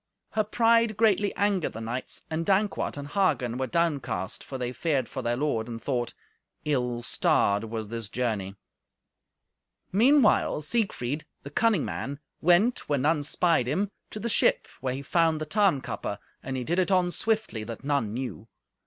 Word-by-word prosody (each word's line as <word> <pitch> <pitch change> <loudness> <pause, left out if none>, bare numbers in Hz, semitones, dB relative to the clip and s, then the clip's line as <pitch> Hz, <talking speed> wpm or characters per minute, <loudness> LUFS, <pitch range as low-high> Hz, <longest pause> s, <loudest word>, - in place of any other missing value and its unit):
Her 215 - +1
pride 230 0 +3
greatly 210 -2 +3
angered 200 -4 +1
the 115 - -6
knights, 115 +3 -4
and 160 0 -2
Dankwart 195 -2 +1
and 145 0 -5
Hagen 130 - +1
were 130 - -1
downcast, 130 - -1
for 135 - -6
they 125 -1 -2
feared 135 -2 0
for 130 - -5
their 120 0 -1
lord, 125 -6 0
and 115 -1 -6
thought, 120 -2 -2 0.5
"Ill 125 -5 0
starred 100 -3 +2
was 110 -1 -5
this 115 -2 -5
journey." 105 -6 -2 1.4
Meanwhile, 225 - +4
Siegfried, 150 - -1 0.2
the 140 - -8
cunning 215 0 +2
man, 140 +1 -4 0.2
went, 180 +8 +3
when 140 -3 +1
none 155 0 +3
spied 150 -2 +2
him, 190 +9 0 0.2
to 215 - -7
the 235 - -3
ship, 235 - +2
where 130 -1 -2
he 140 - -6
found 165 +1 +2
the 155 - -3
Tarnkappe, 155 - 0 0.2
and 130 0 -4
he 125 - -2
did 170 +8 0
it 185 - +2
on 180 -2 +3
swiftly, 215 - 0
that 115 +3 -7
none 140 -7 0
knew. 115 -3 -5
145 Hz, 165 wpm, -27 LUFS, 120-190 Hz, 1.4 s, Meanwhile